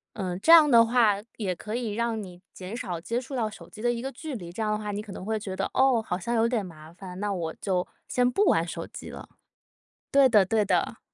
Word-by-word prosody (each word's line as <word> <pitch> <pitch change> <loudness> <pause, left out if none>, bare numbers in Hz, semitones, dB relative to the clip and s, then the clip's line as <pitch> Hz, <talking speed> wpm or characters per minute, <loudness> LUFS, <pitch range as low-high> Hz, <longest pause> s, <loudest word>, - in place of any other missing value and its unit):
嗯， 185 -4 -3
这 320 - +2
样 315 -3 +9
的 230 -1 +7
话， 230 -3 +3 0.2
也 190 -5 -2
可 215 +5 -7
以 230 -4 -3
让 230 0 -1
你 180 -3 -10
减 190 +5 -7
少 175 -8 -4
接 230 +8 -2
触 260 +1 -7
到 225 -3 0
手 215 - -12
机 215 - -13
的 240 0 +2
一 235 - -4
个 270 - -3
距 295 +2 -7
离， 175 -7 -7
这 210 - -7
样 215 - 0
的 210 - 0
话 210 -1 -5
你 205 - -3
可 210 -2 -10
能 185 - -8
会 220 +1 -1
觉 200 -3 -6
得， 195 - -2
哦， 260 -3 +4
好 180 -4 -3
像 235 +6 -3
有 230 0 +3
点 235 -5 -1
麻 160 -2 -12
烦， 180 0 -10
那 205 -1 -1
我 165 -4 -3
就， 185 -3 0 0.2
先 250 0 +2
不 395 +11 +2
玩 165 - +3
手 170 -1 -5
机 - - -10
了。 - - -10 0.8
对 275 -2 +6
的， 210 -4 +5
对 215 +2 +2
的。 - - 0
215 Hz, 280 characters per minute, -27 LUFS, 185-240 Hz, 0.8 s, 样